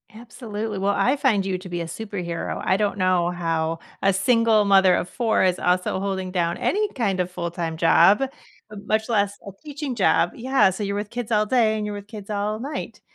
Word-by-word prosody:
Absolutely, 220 -3 -6
well, 200 +1 +1
I 260 +3 +3
find 235 -9 +2
you 185 -1 -2
to 185 0 -10
be 175 -1 -3
a - - -3
superhero. 175 -1 -5
I 190 - +3
don't 205 0 -1
know 185 -2 +2
how 165 -2 -1 0.2
a 195 - +4
single 220 +2 +3
mother 190 -2 +5
of - - -2
4 225 +1 0
is 185 -1 +1
also 180 +1 0
holding 190 -1 -3
down 170 -2 -1
any 425 +2 0
kind 200 -7 -1
of 180 0 0
full-time 170 -2 -4
job, 170 +7 +5 0.5
much 215 +1 -2
less 205 -3 0
a 200 - -6
teaching 290 -3 -5
job, 185 -5 +2
yeah, 260 -4 +2
so, 190 +3 -5
you're 200 0 -2
with 205 0 -4
kids 240 -2 -5
all 215 -1 +3
day 220 -2 +2
and 210 - -3
you're 210 - -4
with 205 0 -8
kids 210 -2 -10
all 210 +1 -2
night, 280 +5 -6
200 Hz, 205 wpm, -23 LUFS, 180-220 Hz, 0.5 s, mother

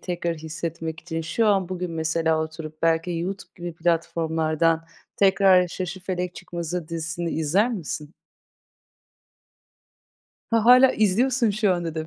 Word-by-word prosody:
tekrar 175 -2 -2
hissetmek 160 0 -5
için 165 -1 -4
şu 215 +8 0
an, 195 -3 +2
bugün 180 -1 -4
mesela 160 0 0
oturup 155 0 -8
belki 165 +1 +2
Youtube 190 +3 -5
gibi 175 -1 -6
platformlardan 165 -1 0 0.3
tekrar 190 -2 +5
Şaşıfelek 180 0 -4
Çıkmazı 170 -1 -5
dizisini 165 0 -3
izler 180 +10 +1
misin? 160 -6 -5 2.4
Ha, 230 -1 +2
hâlâ 255 +2 +7
izliyorsun 230 +3 +2
şu 205 -2 +2
anda 170 -2 -4
da. 160 -1 -4
170 Hz, 120 wpm, -24 LUFS, 160-190 Hz, 2.4 s, hâlâ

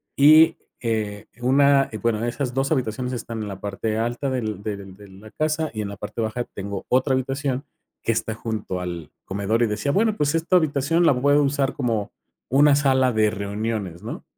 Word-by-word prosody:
y, 155 +3 +7 0.2
eh, 110 -3 -2 0.2
una 140 +2 +4
bueno, 115 -1 0
esas 125 +1 -2
2 135 +3 0
habitaciones 125 -2 -1
están 115 -2 -5
en 105 - -4
la 95 0 -7
parte 105 +2 -3
alta 120 +4 -1
del 110 -6 -3
del 100 -3 -6
de 100 +1 -14
la 105 +3 -14
casa 155 0 -1
y 110 - -3
en 100 - -4
la 100 - -8
parte 105 +3 -5
baja 110 +2 -2
tengo 100 0 -5
otra 130 +2 +2
habitación 135 +1 -1 0.4
que 115 - +1
está 110 0 -2
junto 110 -4 -4
al 85 -3 -6
comedor 100 +4 -1
y - - +3
decía: 105 +7 -1
"Bueno, 215 +5 +2
pues, 145 +2 +1
esta 165 +3 +1
habitación 155 +1 +2
la 135 -6 +4
puedo 145 +2 +4
usar 140 -1 0
como 115 -6 -2 0.4
una 140 +2 +5
sala 130 -2 +3
de 110 -2 +3
reuniones", 100 -3 -3
¿no? 115 - -6
120 Hz, 190 wpm, -23 LUFS, 105-140 Hz, 0.4 s, y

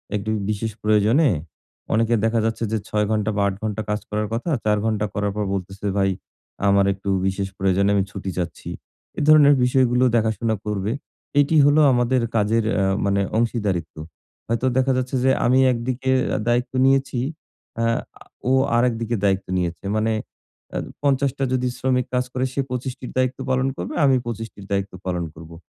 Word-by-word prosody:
একটু 105 +1 -3 0.2
বিশেষ 110 +1 -2
প্রয়োজনে, 110 +8 +4 0.6
অনেকের 115 0 +2
দেখা 115 0 +2
যাচ্ছে 115 +1 -1
যে 110 - +1
৬ 105 0 0
ঘন্টা 110 0 0
বা - - +2
৮ 95 - -2
ঘন্টা 110 0 -2
কাজ 105 0 0
করার 105 0 -1
কথা। 125 +9 -2 0.2
৪ 105 0 +3
ঘন্টা 105 -1 0
করার 100 0 -1
পর 105 - -1
বলতেছে, 95 +1 -5
"ভাই 95 0 +3 0.6
আমার 100 0 +4
একটু 100 +1 -6 0.2
বিশেষ 95 0 -1
প্রয়োজনে 95 +1 +2
আমি 100 - +3
ছুটি 95 -2 -5
চাচ্ছি।" 85 -2 -4 0.5
এ - - -1
ধরনের 145 -2 +7
বিষয়গুলো 125 -1 +3
দেখাশোনা 110 0 +1
করবে। 105 0 -2 0.5
এটি 150 +3 +3
হলো 145 +2 +5
আমাদের 120 0 +2
কাজের 110 +1 +2
অ্যা 95 - +2 0.2
মানে 100 0 +2 0.2
অংশীদারিত্ব। 105 -9 -1 0.5
হয়তো 115 +2 -1
দেখা 130 +1 +3
যাচ্ছে 130 +1 -2
যে 130 - +4
আমি 130 +2 +4
একদিকে 125 +2 -2 0.3
আ - - 0
দায়িত্ব 120 +2 +1
নিয়েছি 135 -2 +2 0.6
অ্যা 115 0 +1 0.3
আ - - -11 0.3
ও - - +3 0.3
আরেকদিকে 120 -1 +1
দায়িত্ব 95 -1 +1
নিয়েছে। 85 0 -3
মানে 110 +1 +1 0.6
অ্যা - - -2 0.2
৫০ 140 -1 +2
টা 135 - -1
যদি 125 0 +1
শ্রমিক 125 -1 +1
কাজ 125 0 +1
করে 130 +1 0
সে 140 - 0
২৫ 125 0 -3
টির 125 - -7
দায়িত্ব 130 0 0
পালন 130 +1 +1
করবে 90 - -5
আমি 135 -1 +5
২৫ 115 -1 -4
টির 100 - -12
দায়িত্ব 100 0 -1
পালন 90 -2 -1
করবো। 80 +1 -12
115 Hz, 175 wpm, -22 LUFS, 100-125 Hz, 0.6 s, ধরনের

